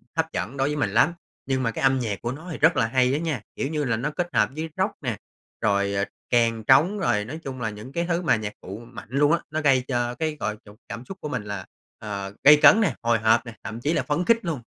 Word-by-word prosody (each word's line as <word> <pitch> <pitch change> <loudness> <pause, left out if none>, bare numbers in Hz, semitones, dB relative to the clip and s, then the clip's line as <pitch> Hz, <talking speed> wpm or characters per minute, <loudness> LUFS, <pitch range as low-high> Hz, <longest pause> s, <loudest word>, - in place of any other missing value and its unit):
hấp 160 0 +2
dẫn 140 - -4
đối 135 0 +1
với 150 - -2
mình 145 -9 0
lắm. 115 - +3 0.3
Nhưng 130 -1 0
mà 115 - 0
cái - - -5
âm 135 0 +4
nhạc 110 -5 -3
của 120 - -2
nó 155 +7 -9
thì - - -5
rất 160 +3 +4
là 115 - +3
hay 125 +2 +2
á 145 - 0
nha, 160 -5 -2
kiểu - - -2
như 150 -1 -1
là, 115 -5 0
nó 135 +6 -2
kết 175 +3 -2
hợp 105 - +3
với 160 +1 -4
rock 190 +3 +1
nè, 120 -6 -2 0.4
rồi, 100 -1 +1
ờ, 100 0 0 0.3
kèn, 115 -2 +2
trống, 160 - +4
rồi 105 - +1
nói 150 +8 -7
chung 130 -2 -6
là 110 - -1
những 110 +4 -9
cái 170 +4 -1
thứ 175 0 0
mà 165 - +3
nhạc 105 -1 -4
cụ 95 +2 -7
mạnh 120 -2 -11
luôn 145 +4 +3
á. 170 - +3
Nó 155 +1 -1
gây 135 -3 +3
cho 120 -2 -1
cái 155 +3 -2
gọi 110 0 -2
cho 105 - -13 0.2
cảm 115 +2 -7
xúc 195 - -8
của 150 - -4
mình 125 -7 -3
là, 100 -3 -6 0.3
ờ, 100 -2 -5
gay 150 +1 +9
cấn 210 +8 +7
nè, 205 - +1
hồi 115 -1 +2
hộp 110 +3 +3
nè, 120 - -8
thậm 110 +3 -6
chí 150 +6 0
là - - 0
phấn 155 +4 -1
khích 230 0 +3
luôn! 160 -7 -2
130 Hz, 280 wpm, -24 LUFS, 110-155 Hz, 0.4 s, gay